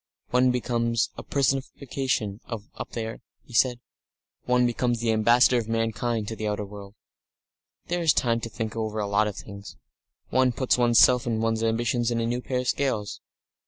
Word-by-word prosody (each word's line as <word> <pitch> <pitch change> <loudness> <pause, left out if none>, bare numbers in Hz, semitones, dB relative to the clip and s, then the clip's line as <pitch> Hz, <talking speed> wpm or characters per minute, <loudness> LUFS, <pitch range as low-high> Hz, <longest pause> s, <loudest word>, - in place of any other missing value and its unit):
"One 125 +1 +4
becomes 115 -2 0
a - - -7
personification 135 -5 -1
up 110 -3 -7
there," 110 -1 -5 0.2
he - - -16
said. 120 +3 +3 0.7
"One 125 0 +3
becomes 120 0 0
the 115 0 +1
ambassador 120 +3 +4
of 110 - -5
mankind 115 0 -1
to 110 - -4
the 110 -1 -3
outer 105 0 -2
world. 100 0 -11 0.9
"There 175 0 -2
is 165 -2 +5
time 115 -5 +1
to 115 - -6
think 110 0 -5
over 110 -1 -3
a 105 - 0
lot 100 +1 +2
of 105 - -4
things. 100 -1 -10 0.5
One 130 -1 +3
puts 130 +2 +1
one's 120 -1 +3
self 125 -1 +6
and 115 -2 0
one's 115 0 0
ambition 115 +2 0
in 120 -1 0
a 115 - 0
new 120 +2 -1
pair 125 0 -2
of 125 - -6
scales.... 115 -9 -1
115 Hz, 180 wpm, -26 LUFS, 110-125 Hz, 0.9 s, self